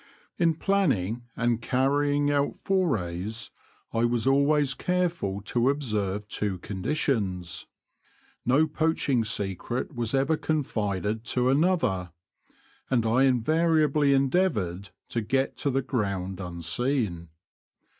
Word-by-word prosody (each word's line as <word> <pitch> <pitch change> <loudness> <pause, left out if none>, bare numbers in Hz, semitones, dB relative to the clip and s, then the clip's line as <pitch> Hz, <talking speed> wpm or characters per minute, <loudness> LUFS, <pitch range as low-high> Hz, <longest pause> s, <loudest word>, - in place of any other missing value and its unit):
In 165 -2 +3
planning 125 - 0
and 120 0 0
carrying 145 +3 +1
out 145 0 +1
forays 110 - -1 0.4
I 115 - +1
was 120 -1 +1
always 140 +1 +3
careful 175 - -1
to 120 +5 +1
observe 105 -8 -1
two 105 -3 -2
conditions. 95 - -2 0.8
No 140 +6 +4
poaching 155 -5 +1
secret 110 - -3
was 120 0 -2
ever 140 +4 +2
confided 110 - -1
to 125 +1 +1
another; 135 - +1 0.8
and 120 -4 +2
I 125 +4 +4
invariably 150 +3 +3
endeavoured 130 - +1 0.2
to 115 - -1
get 135 +5 0
to 145 - 0
the 135 0 0
ground 100 -7 -2
unseen. 90 - -1
125 Hz, 105 wpm, -27 LUFS, 100-145 Hz, 0.8 s, No